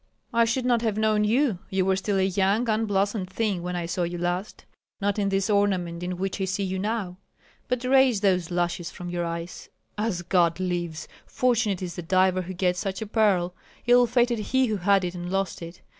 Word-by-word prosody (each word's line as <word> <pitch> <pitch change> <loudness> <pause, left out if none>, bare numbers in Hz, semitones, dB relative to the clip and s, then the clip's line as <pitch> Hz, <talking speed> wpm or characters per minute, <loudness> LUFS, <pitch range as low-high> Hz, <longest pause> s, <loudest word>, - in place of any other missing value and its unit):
"I 230 0 +4
should 245 +2 -1
not 240 -2 +2
have 220 -3 -1
known 215 -1 +2
you; 230 -3 +2
you 190 -2 0
were 190 0 +2
still 195 +1 -1
a 190 - +3
young, 195 +5 +1
unblossomed 205 -3 0
thing 195 -2 -1
when 180 +1 -4
I 175 -1 -2
saw 175 +2 -3
you 175 0 -2
last, 175 +3 -3 0.3
not 205 0 0
in 200 -1 +1
this 195 -1 0
ornament 190 -5 +1
in 180 0 -3
which 195 +1 -3
I - - +1
see 190 +2 -2
you 190 0 -2
now. 205 -3 -2 0.5
But 250 0 -1
raise 255 -4 +4
those 185 -4 +2
lashes 175 -1 -1
from 175 0 -8
your 175 -1 -2
eyes. 170 +1 -6 0.3
As 210 -5 -1
God 175 -1 +2
lives! 175 -3 -3 0.2
fortunate 230 -7 +1
is 175 -1 -6
the - - -3
diver 185 +2 +2
who 185 +1 -6
gets 180 0 0
such 195 +2 -3
a - - -6
pearl, 200 -5 +2 0.3
ill 245 0 +5
fated 240 -1 +2
he 260 +5 +1
who 215 -3 -1
had 195 +1 +3
it 175 - -3
and 175 -1 -6
lost 195 -1 -2
it. 170 +1 -9
195 Hz, 210 wpm, -25 LUFS, 180-215 Hz, 0.5 s, ill